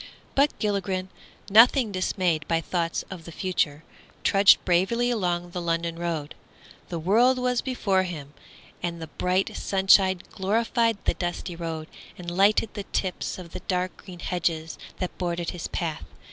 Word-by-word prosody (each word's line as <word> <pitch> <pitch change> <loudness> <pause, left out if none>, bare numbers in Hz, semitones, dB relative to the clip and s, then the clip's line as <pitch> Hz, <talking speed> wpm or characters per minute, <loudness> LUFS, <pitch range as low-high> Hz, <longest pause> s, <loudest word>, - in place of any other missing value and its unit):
But 280 +2 +3
Gilligren, 190 -3 -1 0.4
nothing 230 +3 +6
dismayed 185 -4 0
by 165 -1 +2
thoughts 165 0 -2
of 180 -4 -7
the 170 - -9
future, 165 -4 -1 0.4
trudged 195 0 +6
bravely 215 +8 +2
along 175 -5 -1
the 180 - -4
London 170 0 -1
road. 165 -4 -3 0.6
The 170 - -3
world 225 +10 +4
was 250 -1 +1
before 205 -7 +1
him, 155 -6 -6 0.5
and 170 -1 -3
the 165 - -5 0.2
bright 185 +2 +1
sunshine 190 -1 +4
glorified 225 +3 +1
the - - +3
dusty 175 0 -4
road 165 -2 -5 0.3
and 175 -1 -6
lightened 205 +3 +3
the 205 - -5
tips 185 -2 -2
of 175 -3 -10
the - - -6
dark 180 -1 -1
green 180 -3 -11
hedges 165 -2 -2 0.2
that 185 - -4
bordered 175 -2 -2
his 175 - -5
path. 165 - -3
180 Hz, 150 wpm, -26 LUFS, 170-200 Hz, 0.6 s, nothing